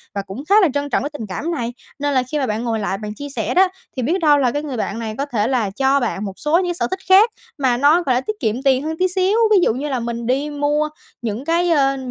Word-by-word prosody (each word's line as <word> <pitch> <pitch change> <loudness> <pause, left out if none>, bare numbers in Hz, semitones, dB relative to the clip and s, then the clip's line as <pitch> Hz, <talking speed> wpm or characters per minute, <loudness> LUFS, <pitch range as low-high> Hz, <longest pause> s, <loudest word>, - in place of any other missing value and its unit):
và 200 - -1
cũng 195 +7 -8
khá 400 - +5
là 370 - +5
trân 285 0 -2
trọng - - 0
cái 285 - -2
tình 225 -7 -6
cảm 290 - -3
này, 245 -7 -3 0.3
nên 290 0 0
là 255 -1 +2
khi 305 - 0
mà 270 - 0
bạn 215 +1 -2
ngồi 230 -2 -1
lại 200 -2 -2
bạn 210 0 -6
chia 285 +3 -7
sẻ 280 - -2
đó 375 +1 +5 0.3
thì 255 - -1
biết 335 +10 +1
đâu 300 -3 +5
là 260 -4 +2
cái 290 +4 -3
người 275 -5 -4
bạn 220 0 -3
này 220 -2 -4
có 280 - -1
thể 230 -6 -1
là 240 -6 0
cho 270 +7 +2
bạn 210 -5 -2
một 195 - -5
số 310 +2 +2
những 370 - +1
cái 350 - -1
sở 345 - -1
thích 375 - -4
khác 395 +5 +7 0.3
mà 260 -4 +1
nó, 300 +7 +4
gọi 260 -6 +1
là, 250 - +1
tiết 430 +9 -4
kiệm 220 +4 -1
tiền 270 -1 +3
hơn 320 +1 -3
tí 370 - +3
xíu. 375 +3 +1
Ví 420 - +6
dụ - - +3
như 280 +5 -4
là 260 -3 -1
mình 235 0 -4
đi 275 +4 0
mua 295 +1 0 0.3
những 230 +2 -4
cái, 340 +2 +1
ơ, 275 -3 +3
275 Hz, 300 wpm, -20 LUFS, 235-305 Hz, 0.3 s, khác